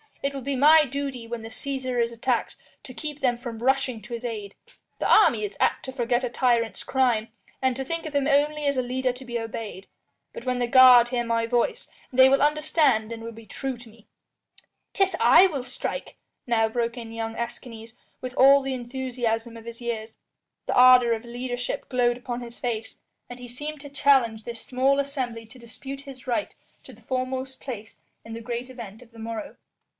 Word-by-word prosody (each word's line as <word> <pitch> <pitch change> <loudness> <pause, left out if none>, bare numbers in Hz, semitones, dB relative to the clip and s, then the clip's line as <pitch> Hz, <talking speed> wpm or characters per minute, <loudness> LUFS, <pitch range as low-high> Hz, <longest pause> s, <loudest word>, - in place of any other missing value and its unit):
It 275 0 0
will 275 - -4
be 275 +2 -2
my 300 +4 +7
duty 270 -3 -5
when 235 0 -5
the 225 - -7
Cæsar 260 -1 -3
is 235 0 0
attacked 235 +1 -1 0.3
to 255 - -10
keep 295 +2 -6
them 245 -3 +2
from 235 -2 -7
rushing 260 -2 +1
to 240 +3 -9
his 235 +1 -5
aid. 210 -4 -5 0.4
The - - 0
army 235 - +5
is 200 -1 -5
apt - - +1
to 260 - -5
forget 245 -1 0
a 250 - -1
tyrant's 235 -2 +1
crime, 245 -4 +1 0.3
and 260 -1 +1
to 270 - -3
think 330 +5 -4
of 305 - -8
him 285 -1 +1
only 295 +1 +2
as 280 -1 +1
a - - +3
leader 255 +1 -1
to 255 +1 -10
be 240 -1 -3
obeyed. 220 -4 -6 0.5
But - - -9
when 255 -1 0
the 245 - +1
guard 250 -1 +8
hear 245 -1 0
my 230 -1 0
voice, 245 - 0 0.3
they 260 +1 +7
will 275 +1 +3
understand 295 -6 +2
and 225 -1 -6
will 230 - -6
be 225 0 -13
true 265 +4 -4
to 240 -1 -13
me." 220 -1 -20 0.9
"'Tis 390 -1 +2
I 385 - +7
will 285 -8 -4
strike," 380 - -5 0.3
now 225 -2 +3
broke 235 +1 -2
in 230 -2 -7
young 225 0 -4
Escanes, 230 -1 -6 0.3
with 255 0 -6
all 275 +1 +7
the 270 0 -3
enthusiasm 240 -2 -3
of 225 - -12
his 235 +1 -8
years. 225 -2 -4 0.5
The - - 0
ardour 250 -1 +7
of 225 +1 -5
leadership 245 +1 -4
glowed 245 -2 +2
upon 245 -1 -5
his 235 0 -10
face, 225 -3 -4 0.3
and 245 0 -9
he 245 - -9
seemed 295 +5 -6
to 285 - -9
challenge 265 -6 +3
this 235 0 -7
small 265 +2 +1
assembly 255 -5 -3
to 235 +3 -15
dispute 270 +4 -8
his 275 -2 -11
right 255 +5 -1 0.3
to - - -13
the - - -18
foremost 260 0 -3
place 225 -4 -8 0.3
in 225 - -8
the 230 - -6
great 240 +2 -5
event 230 -2 -10
of 235 - -22
the 230 - -15
morrow. 230 +6 -6
245 Hz, 205 wpm, -25 LUFS, 230-270 Hz, 0.9 s, guard